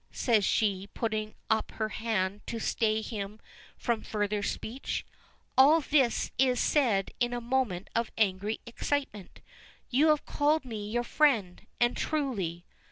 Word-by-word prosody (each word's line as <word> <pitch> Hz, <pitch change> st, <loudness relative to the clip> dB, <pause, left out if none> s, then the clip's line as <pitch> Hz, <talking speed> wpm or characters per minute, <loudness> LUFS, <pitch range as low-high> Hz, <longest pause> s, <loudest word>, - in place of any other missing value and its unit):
says 225 Hz, -5 st, +2 dB
she, 195 Hz, -1 st, +1 dB
putting 215 Hz, -2 st, -2 dB, 0.2 s
up 220 Hz, -1 st, +1 dB
her 215 Hz, -1 st, -2 dB
hand 210 Hz, -3 st, -1 dB
to 230 Hz, -, -3 dB
stay 220 Hz, 0 st, +1 dB
him 210 Hz, -1 st, -5 dB, 0.4 s
from 235 Hz, -3 st, -1 dB
further 210 Hz, -1 st, -1 dB
speech. 230 Hz, +5 st, -3 dB, 0.5 s
"All 290 Hz, +5 st, +7 dB
this 275 Hz, -5 st, +2 dB
is 255 Hz, -2 st, +3 dB
said 230 Hz, -10 st, +2 dB
in 240 Hz, 0 st, +1 dB
a 245 Hz, -, -1 dB
moment 235 Hz, -7 st, -1 dB
of 230 Hz, 0 st, +1 dB
angry 205 Hz, 0 st, 0 dB
excitement. 235 Hz, -4 st, -3 dB, 0.5 s
You 280 Hz, +5 st, +4 dB
have 305 Hz, -1 st, +3 dB
called 300 Hz, 0 st, +1 dB
me 215 Hz, -4 st, -5 dB
your 240 Hz, +2 st, 0 dB
friend 235 Hz, -10 st, +1 dB
and 240 Hz, 0 st, +3 dB
truly. 200 Hz, -, -2 dB
225 Hz, 140 wpm, -29 LUFS, 205-260 Hz, 0.5 s, All